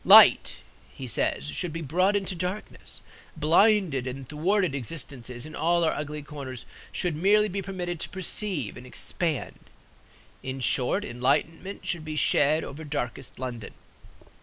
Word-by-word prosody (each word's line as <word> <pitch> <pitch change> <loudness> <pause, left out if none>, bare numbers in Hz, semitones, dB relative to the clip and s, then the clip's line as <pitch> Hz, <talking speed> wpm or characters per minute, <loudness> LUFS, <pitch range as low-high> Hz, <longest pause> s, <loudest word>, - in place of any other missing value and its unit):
Light - - +8 0.3
(he 135 - -6
says) 110 - 0
should 165 - -2
be 165 +1 -4
brought 185 +8 +2
into 195 -1 0
darkness; 180 +4 -5 0.3
blinded 165 - +4
and 130 0 -5
thwarted 175 +3 +1
existences 125 -2 -5
in 155 - -9
all 170 +1 +2
our 160 - +3
ugly 150 0 -4
corners 135 -5 -7 0.3
should 175 -4 -1
merely 205 +6 +4
be 200 0 -3
permitted 180 -3 -4
to - - -3
perceive 190 - -3
and 125 +1 -10
expand; 155 +3 -2 0.8
in 130 0 -4
short, 130 +10 +1
enlightenment 165 +9 -1
should 170 -3 -2
be 155 0 -5
shed 155 +1 +3
over 150 +3 -7
darkest 135 -3 -4
London. 120 -5 -6
155 Hz, 140 wpm, -27 LUFS, 135-180 Hz, 0.8 s, Light